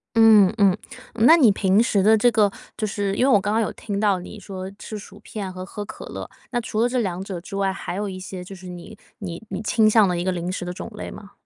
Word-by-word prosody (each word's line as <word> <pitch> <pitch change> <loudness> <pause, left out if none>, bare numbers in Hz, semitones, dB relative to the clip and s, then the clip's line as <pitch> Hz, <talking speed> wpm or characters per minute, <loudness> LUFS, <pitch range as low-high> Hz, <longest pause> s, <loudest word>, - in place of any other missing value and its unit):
嗯 220 -4 +7
嗯， 195 -2 +5 0.4
那 240 +8 +7
你 245 -9 +6
平 195 +1 +3
时 200 -4 +2
的 220 +1 +6
这 230 +3 +4
个 210 -2 +3 0.3
就 215 - -1
是 200 -1 -2
因 250 - +2
为 270 - +4
我 205 - +5
刚 205 - -1
刚 220 - +2
有 - - -1
听 200 -2 -4
到， 205 -3 +2
你 205 +4 -9
说 190 -1 -7
吃 215 - -8
薯 205 0 -12
片 205 -3 -6
和 185 0 -7
喝 205 +1 -6
可 - - -9
乐， - - -7 0.2
那 240 -1 0
除 220 -1 -3
了 240 - +4
这 250 0 0
两 190 -3 -2
者 190 -3 -6
之 195 - -8
外， 195 -1 0
还 185 - -5
有 205 +1 -2
一 185 -1 -6
些 185 -1 -7
就 195 +2 -10
是 185 0 -11
你 180 +4 -9 0.2
你 175 -4 -6
你 190 - -4
倾 220 0 +3
向 215 -2 +5
的 180 -1 -1
一 175 - -1
个 185 - 0
零 175 0 -3
食 185 - -4
的 180 - -4
种 180 - -7
类 - - -6
吗？ 205 -1 -11
200 Hz, 295 characters per minute, -23 LUFS, 185-215 Hz, 0.4 s, 嗯